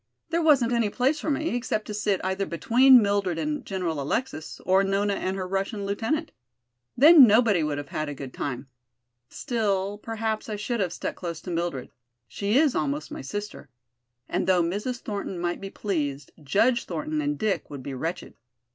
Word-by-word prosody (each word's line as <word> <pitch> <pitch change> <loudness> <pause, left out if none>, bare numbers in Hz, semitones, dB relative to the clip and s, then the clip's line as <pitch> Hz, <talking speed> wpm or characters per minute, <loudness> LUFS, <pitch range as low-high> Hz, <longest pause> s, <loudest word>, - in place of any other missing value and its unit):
There 335 +1 +1
wasn't 275 -7 +4
any 230 -3 +2
place 260 +8 +1
for - - -3
me, 305 +3 0
except 235 -3 -2
to 210 - -6
sit 205 -2 0
either 190 +1 -1
between 245 +8 +5
Mildred 200 -4 0
and 295 - -2
General 175 -6 -3
Alexis, 155 - -3
or 190 +1 +4
Nona 200 +1 +1
and 190 0 -2
her 185 -1 -3
Russian 195 +2 -2
lieutenant. 235 +11 -2 0.7
Then 295 0 +9
nobody 215 -4 +4
would 150 -2 -1
have 145 0 -6
had 155 -3 -3
a 145 - -5
good 135 -2 -8
time. 135 -1 -4 0.6
Still, 205 -5 -1
perhaps 220 0 -3
I 215 - -2
should 220 +3 -3
have 185 -4 0
stuck - - -4
close 170 -3 -5
to 180 - -6
Mildred; 170 -6 -3 0.4
she 205 - 0
is 290 -3 +4
almost 150 0 -2
my - - -6
sister. 205 +1 -6 0.6
And 180 0 -1
though 180 -2 +4
Mrs. 210 +8 -3
Thornton 200 -3 -4
might 175 0 -2
be 195 - -6
pleased, 145 -10 -3
Judge 230 - +2
Thornton 305 0 -3
and 295 0 -1
Dick 215 -2 -1
would 140 -3 -8
be 140 - -5
wretched. 165 +7 -4
200 Hz, 180 wpm, -26 LUFS, 170-235 Hz, 0.7 s, Then